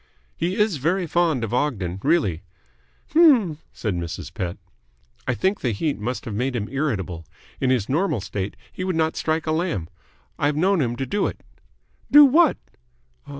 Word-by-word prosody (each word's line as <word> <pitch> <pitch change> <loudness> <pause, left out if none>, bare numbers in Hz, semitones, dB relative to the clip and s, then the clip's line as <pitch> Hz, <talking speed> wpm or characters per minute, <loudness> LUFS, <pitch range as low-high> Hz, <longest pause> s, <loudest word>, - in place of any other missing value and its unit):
"He 175 +3 -1
is 210 -6 +1
very 175 +7 0
fond 165 -6 +1
of 115 - -3
Ogden 100 -10 -1
really." 140 - +1 0.7
"H'm," 255 - +5
said 105 -4 -3
Mrs. 85 -1 -5
Pett. 90 -1 -4 0.7
"I 130 - +1
think 190 +8 0
the 120 -4 0
heat 145 +6 -2
must 125 +5 -4
have 115 - -5
made 125 +5 -1
him 105 -3 -2
irritable. 105 - -2 0.4
In 130 - +1
his 125 -6 +1
normal 160 - +1
state 100 0 -4 0.2
he 185 - -5
would 185 -2 -1
not 160 0 +1
strike 160 0 -1
a 155 - 0
lamb. 160 - -1 0.5
I've 145 +1 +1
known 185 +1 +3
him 120 -3 0
to 135 - -3
do 205 +10 0
it." - - -7 0.7
"Do 295 0 +9
what?" 310 +3 +4
145 Hz, 170 wpm, -23 LUFS, 110-175 Hz, 0.7 s, Do